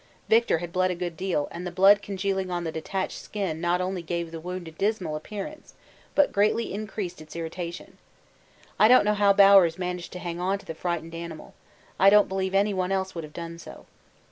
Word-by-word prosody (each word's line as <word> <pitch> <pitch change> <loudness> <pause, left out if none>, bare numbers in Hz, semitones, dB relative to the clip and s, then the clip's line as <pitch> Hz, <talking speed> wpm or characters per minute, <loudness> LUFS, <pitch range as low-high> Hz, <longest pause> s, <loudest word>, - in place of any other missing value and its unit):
Victor 225 -5 +4
had 170 +1 -7
bled 185 0 +2
a 180 - -1
good 175 -1 -4
deal, 180 -4 -1
and 170 - -7
the 180 - -3
blood 195 +3 +5
congealing 195 -1 -2
on 175 -1 -2
the 165 - -3
detached 185 +4 -4
skin 185 -7 -4
not 175 +1 +1
only 185 0 -2
gave 170 0 -4
the 165 - -6
wound 180 +1 -6
a - - -8
dismal 190 -2 -1
appearance 210 - -8 0.4
but 290 - +4
greatly 210 +2 +1
increased 200 -4 -5
its 155 +1 -12
irritation. 170 +1 -6 0.8
I 215 - +7
don't 250 -2 +6
know 210 - +3
how 205 -1 +4
Bowers 195 -4 +6
managed 180 -1 -4
to - - -6
hang 175 -1 -5
on 190 +2 0
to 200 - -16
the - - -5
frightened 165 0 -4
animal; 165 -1 -8 0.5
I 195 - +7
don't 210 0 +6
believe 190 0 -2
anyone 195 -2 +1
else 190 -1 -1
would 165 - -5
have 155 - -10
done 170 +1 -7
so. - - -12
180 Hz, 205 wpm, -26 LUFS, 170-200 Hz, 0.8 s, I